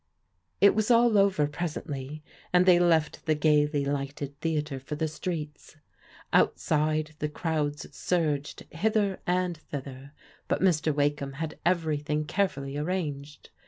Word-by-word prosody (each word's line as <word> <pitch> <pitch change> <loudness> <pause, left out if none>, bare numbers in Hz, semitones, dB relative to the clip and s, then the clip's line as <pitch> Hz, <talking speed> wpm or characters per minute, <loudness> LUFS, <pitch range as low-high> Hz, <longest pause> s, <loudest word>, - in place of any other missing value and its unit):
It 200 0 +7
was 215 +1 0
all 235 -1 +5
over 195 -6 +4
presently, 150 -2 -5 0.3
and 180 0 +5
they 180 -2 +6
left 165 -4 +1
the 155 - +3
gaily 150 -1 +2
lighted 140 0 -3
theatre 150 -4 -2
for 135 +3 -6
the 160 +1 -1
streets. 155 -1 -6 0.6
Outside, 155 0 +2
the 150 - -1
crowds 150 -2 -2
surged 150 -5 -1
hither 205 +2 0
and 180 -1 +1
thither, 140 -2 -8 0.3
but - - 0
Mr. 160 -4 +2
Wakeham 145 -1 0
had 155 +2 -5
everything 155 -3 0
carefully 145 -6 -1
arranged. 150 -3 -4
155 Hz, 125 wpm, -28 LUFS, 145-175 Hz, 0.6 s, It